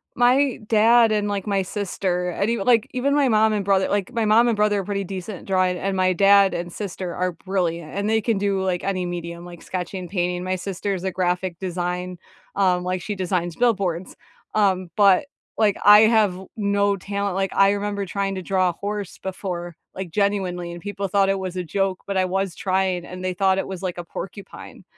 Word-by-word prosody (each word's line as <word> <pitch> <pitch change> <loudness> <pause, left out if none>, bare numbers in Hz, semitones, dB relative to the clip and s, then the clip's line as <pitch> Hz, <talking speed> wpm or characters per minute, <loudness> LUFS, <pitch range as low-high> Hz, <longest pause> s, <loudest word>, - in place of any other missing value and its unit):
My 255 +2 +3
dad 225 +1 +5
and, 210 -1 +1
like, 200 0 -3
my 200 -1 +1
sister, 185 -2 -2
and 200 +4 -1
even 230 -4 -1
like, 240 -1 +4
even 270 +3 +1
my 285 -3 +3
mom 220 -1 +3
and 205 - -1
brother 195 -1 +2
like, 200 0 -1
my 230 -3 0
mom 225 +3 +5
and 235 - +2
brother 210 -1 +2
are - - -3
pretty 200 +1 -2
decent 190 +1 -6
at - - -15
drawing, 185 -1 +1
and 195 +1 -2
my 185 0 +2
dad 195 0 +5
and 175 0 -4
sister 185 -3 -5
are 180 0 0
brilliant, 170 -3 -3
and 200 +1 -1
they 220 0 +3
can 220 0 0
do, 195 -1 0
like, 185 -2 -1
any 185 -2 -1
medium, 170 -1 -6
like 175 -1 -11
sketching, 180 0 -5
painting, 180 -1 -1
my 185 0 -1
sister's 190 0 -3
a 190 - -1
graphic 180 -1 -1
design, 180 0 -3 0.4
um 185 -2 +2
like, 180 0 -2
she 205 +3 -4
designs 180 -3 -2
billboards, 195 -7 0 0.4
um, 190 -4 +2
but, 200 0 +5 0.3
like, 210 -3 +2
I 210 +1 +9
have 220 -4 +4 0.2
no 200 -1 +1
talent 200 0 -3
like, 195 -1 -1
I 195 0 +5
remember 205 0 -2
trying 195 +1 -2
to 185 - -4
draw 185 0 +1
a - - -3
horse 205 +1 -5
before, 180 -3 -5 0.2
like, 185 -3 -6
genuinely, 190 -3 -1
and 175 - -9
people 200 0 -4
thought 195 +1 +2
it 195 0 +1
was 185 -1 -5
a 180 - -2
joke, 195 +2 -1
but 200 -1 -2
I 185 - +3
was 190 -1 -2
trying, 185 -2 0
and 185 0 -8
they 185 0 -1
thought 190 +1 +2
it - - -3
was 190 -2 -6
like 180 -2 -3
a 175 - -4
porcupine, 195 +3 -9
195 Hz, 210 wpm, -23 LUFS, 180-205 Hz, 0.4 s, I